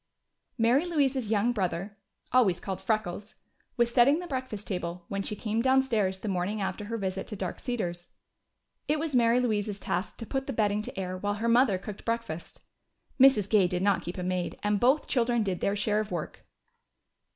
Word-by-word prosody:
Mary 240 Hz, +5 st, +4 dB
Louise's 275 Hz, -9 st, 0 dB
young 220 Hz, +2 st, +2 dB
brother 195 Hz, -2 st, -2 dB, 0.4 s
always 225 Hz, -8 st, +4 dB
called 190 Hz, -1 st, -5 dB
"Freckles" 205 Hz, 0 st, -2 dB, 0.4 s
was 235 Hz, 0 st, +2 dB
setting 270 Hz, +4 st, +5 dB
the 355 Hz, -, -5 dB
breakfast 255 Hz, -, -4 dB
table 175 Hz, -2 st, -4 dB
when 200 Hz, 0 st, -2 dB
she 210 Hz, -, -3 dB
came 220 Hz, +2 st, -1 dB
downstairs 230 Hz, -8 st, +2 dB
the -, -, -5 dB
morning 195 Hz, +2 st, -1 dB
after 195 Hz, +1 st, -3 dB
her 230 Hz, +2 st, -3 dB
visit 190 Hz, -2 st, -3 dB
to 210 Hz, -, -6 dB
Dark 190 Hz, -3 st, -4 dB
Cedars. 175 Hz, -8 st, -3 dB, 0.8 s
It 300 Hz, -, +2 dB
was 310 Hz, -1 st, -3 dB
Mary 235 Hz, -1 st, +4 dB
Louise's 210 Hz, -4 st, -1 dB
task 185 Hz, -, -3 dB
to 230 Hz, -, -6 dB
put 270 Hz, +3 st, -3 dB
the 270 Hz, -, -2 dB
bedding 210 Hz, -2 st, +1 dB
to 205 Hz, -, -7 dB
air 185 Hz, -1 st, -4 dB
while 205 Hz, +1 st, -1 dB
her 225 Hz, +3 st, -2 dB
mother 235 Hz, -4 st, +4 dB
cooked 200 Hz, +2 st, -8 dB
breakfast. 230 Hz, -8 st, -4 dB, 0.6 s
Mrs. 255 Hz, -7 st, +6 dB
Gay 205 Hz, -4 st, +4 dB
did 180 Hz, +1 st, -2 dB
not 200 Hz, -1 st, +3 dB
keep 175 Hz, -, -6 dB
a 180 Hz, -, -3 dB
maid, 180 Hz, -1 st, -2 dB
and 205 Hz, 0 st, +1 dB
both 260 Hz, +7 st, +3 dB
children 240 Hz, -3 st, +1 dB
did 190 Hz, -4 st, -2 dB
their 200 Hz, -, 0 dB
share 210 Hz, +1 st, +1 dB
of 215 Hz, -1 st, -3 dB
the 180 Hz, -, -3 dB
work. 155 Hz, -, -6 dB
210 Hz, 195 wpm, -28 LUFS, 190-240 Hz, 0.8 s, Mrs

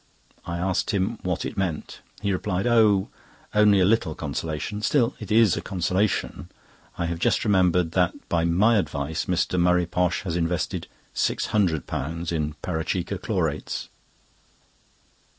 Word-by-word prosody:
I 85 Hz, 0 st, -3 dB
asked 90 Hz, +1 st, 0 dB
him 105 Hz, +2 st, 0 dB
what 90 Hz, 0 st, -2 dB
it -, -, -5 dB
meant. 90 Hz, -6 st, -3 dB, 0.2 s
He 100 Hz, -, +1 dB
replied: 95 Hz, +1 st, -1 dB
"Oh! 110 Hz, -5 st, +4 dB, 0.4 s
only 105 Hz, -1 st, +5 dB
a 90 Hz, -, +4 dB
little 100 Hz, -7 st, +2 dB
consolation—still 85 Hz, -, -1 dB
it -, -, -8 dB
is 110 Hz, -1 st, +5 dB
a -, -, -3 dB
consolation. 95 Hz, +2 st, -1 dB, 0.5 s
I 85 Hz, -, -1 dB
have 85 Hz, 0 st, -3 dB
just -, -, +1 dB
remembered 90 Hz, -4 st, +3 dB
that, 90 Hz, -1 st, +2 dB
by 85 Hz, -1 st, +1 dB
my 100 Hz, +7 st, +4 dB
advice, 80 Hz, -2 st, -2 dB
Mr. 90 Hz, 0 st, 0 dB
Murray 90 Hz, 0 st, +3 dB
Posh 90 Hz, +2 st, 0 dB
has 85 Hz, -4 st, -3 dB
invested 85 Hz, 0 st, -1 dB, 0.3 s
£600 85 Hz, -3 st, -1 dB
in 75 Hz, -2 st, -2 dB
Parachikka 90 Hz, +3 st, -2 dB
Chlorates!" 85 Hz, -9 st, -2 dB
90 Hz, 135 wpm, -25 LUFS, 85-100 Hz, 0.5 s, only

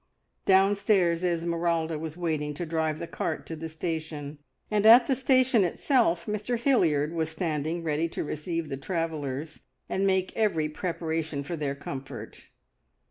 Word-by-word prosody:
Downstairs 190 Hz, -3 st, +3 dB
Esmeralda 170 Hz, -2 st, 0 dB
was 160 Hz, +1 st, -6 dB
waiting 155 Hz, -4 st, -2 dB
to 175 Hz, -, -3 dB
drive 160 Hz, -1 st, -1 dB
the -, -, -5 dB
cart 170 Hz, -, -3 dB
to 165 Hz, -, -6 dB
the 160 Hz, +1 st, -6 dB
station, 155 Hz, -2 st, -5 dB, 0.3 s
and 210 Hz, -1 st, +2 dB
at 235 Hz, +3 st, +9 dB
the 270 Hz, -, +2 dB
station 255 Hz, -4 st, +3 dB
itself 180 Hz, -, +1 dB
Mr 210 Hz, +3 st, -2 dB
Hilliard 165 Hz, -, +2 dB
was 160 Hz, -1 st, -1 dB
standing 160 Hz, 0 st, -2 dB
ready 160 Hz, +1 st, 0 dB
to -, -, -3 dB
receive 160 Hz, +1 st, -3 dB
the 135 Hz, -, -3 dB
travellers 155 Hz, -2 st, -3 dB, 0.3 s
and 195 Hz, +1 st, 0 dB
make 190 Hz, -1 st, +1 dB
every 175 Hz, -9 st, +1 dB
preparation 160 Hz, -2 st, -3 dB
for 170 Hz, +5 st, -4 dB
their 145 Hz, -3 st, -2 dB
comfort. 135 Hz, -5 st, -8 dB
165 Hz, 145 wpm, -27 LUFS, 155-190 Hz, 0.3 s, at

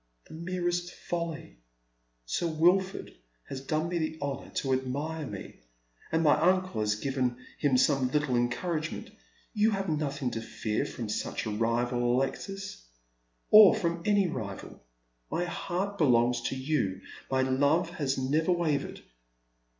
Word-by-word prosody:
" -, -, -29 dB
The -, -, -11 dB
merest 175 Hz, +1 st, -2 dB
folly. 170 Hz, -, -5 dB, 0.7 s
Sir 115 Hz, -, -1 dB
Wilford 180 Hz, +4 st, +2 dB, 0.4 s
has 135 Hz, -, -5 dB
done 155 Hz, +4 st, -1 dB
me 175 Hz, 0 st, -1 dB
the 160 Hz, 0 st, -2 dB
honour 140 Hz, -1 st, -4 dB
to 135 Hz, -1 st, 0 dB
admire 145 Hz, +4 st, -2 dB
me, 100 Hz, -3 st, -8 dB, 0.5 s
and 160 Hz, 0 st, +2 dB
my 150 Hz, -, +5 dB
uncle 185 Hz, -9 st, +2 dB
has 105 Hz, 0 st, +1 dB
given 130 Hz, +1 st, -1 dB, 0.2 s
him 140 Hz, -4 st, +3 dB
some 135 Hz, 0 st, +3 dB
little 145 Hz, -2 st, +1 dB
encourage 155 Hz, +7 st, -1 dB
ment. -, -, -7 dB, 0.4 s
You 215 Hz, 0 st, +3 dB
have 195 Hz, -3 st, -1 dB
nothing 145 Hz, -4 st, -1 dB
to 115 Hz, -, -3 dB
fear 110 Hz, -1 st, -2 dB
from 115 Hz, -, -5 dB
such 105 Hz, -, -3 dB
a 110 Hz, -, -2 dB
rival, 120 Hz, +2 st, +1 dB
Alexis, 195 Hz, -, -3 dB, 0.7 s
or 210 Hz, -1 st, +10 dB
from 170 Hz, -5 st, -1 dB
any 205 Hz, 0 st, +3 dB
rival. 100 Hz, -, -6 dB, 0.5 s
My 175 Hz, -, -1 dB
heart 195 Hz, +3 st, -3 dB
belongs 120 Hz, -4 st, +3 dB
to -, -, -3 dB
you. 130 Hz, -9 st, -1 dB, 0.3 s
My 130 Hz, 0 st, +2 dB
love 145 Hz, +6 st, +2 dB
has 140 Hz, -6 st, -1 dB
never 150 Hz, +6 st, +1 dB
wavered." 160 Hz, -5 st, -1 dB
145 Hz, 145 wpm, -29 LUFS, 125-175 Hz, 0.7 s, or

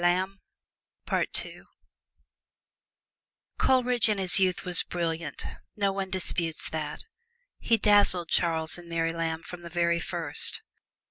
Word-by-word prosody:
Coleridge 250 Hz, -3 st, +2 dB
in 210 Hz, -, 0 dB
his 190 Hz, 0 st, +5 dB
youth 185 Hz, -1 st, 0 dB
was 180 Hz, -1 st, +8 dB
brilliant 165 Hz, -2 st, -4 dB, 0.3 s
no 200 Hz, -2 st, 0 dB
one 195 Hz, -1 st, -4 dB
disputes 170 Hz, -3 st, 0 dB
that. 155 Hz, -2 st, -5 dB, 0.5 s
He 230 Hz, -, +2 dB
dazzled 200 Hz, -5 st, +3 dB
Charles 160 Hz, 0 st, 0 dB
and 170 Hz, -1 st, -13 dB
Mary 165 Hz, 0 st, -1 dB
Lamb 165 Hz, -1 st, -3 dB
from 180 Hz, -1 st, -10 dB
the 170 Hz, -, -9 dB
very 170 Hz, 0 st, 0 dB
first. 165 Hz, -3 st, -1 dB
175 Hz, 110 wpm, -27 LUFS, 165-195 Hz, 0.5 s, was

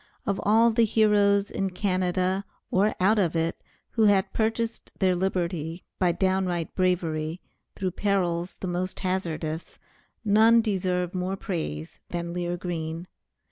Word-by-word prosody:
Of 200 Hz, -2 st, 0 dB
all 225 Hz, +3 st, +5 dB
the 230 Hz, +1 st, +3 dB
heroes 205 Hz, -2 st, +3 dB
in 195 Hz, 0 st, -1 dB
Canada, 185 Hz, 0 st, 0 dB, 0.3 s
or 200 Hz, +3 st, +2 dB
out 210 Hz, +4 st, +4 dB
of 175 Hz, -4 st, +1 dB
it, 165 Hz, 0 st, -1 dB, 0.3 s
who 225 Hz, -2 st, +3 dB
have 200 Hz, -2 st, +3 dB
purchased 225 Hz, +1 st, -1 dB
their 185 Hz, -2 st, +3 dB
liberty 175 Hz, -2 st, -2 dB, 0.2 s
by 180 Hz, -2 st, +3 dB
downright 185 Hz, -2 st, 0 dB
bravery, 170 Hz, -3 st, 0 dB, 0.4 s
through 185 Hz, -1 st, -2 dB
perils 180 Hz, -3 st, 0 dB
the 190 Hz, -, -3 dB
most 180 Hz, +1 st, -3 dB
hazardous, 165 Hz, -4 st, -3 dB, 0.5 s
none 220 Hz, +3 st, +6 dB
deserve 185 Hz, -5 st, 0 dB
more 185 Hz, +1 st, -2 dB
praise 85 Hz, -, -4 dB
than 170 Hz, 0 st, -3 dB
Lear 175 Hz, 0 st, -2 dB
Green. 165 Hz, -1 st, -4 dB
185 Hz, 135 wpm, -26 LUFS, 175-200 Hz, 0.5 s, none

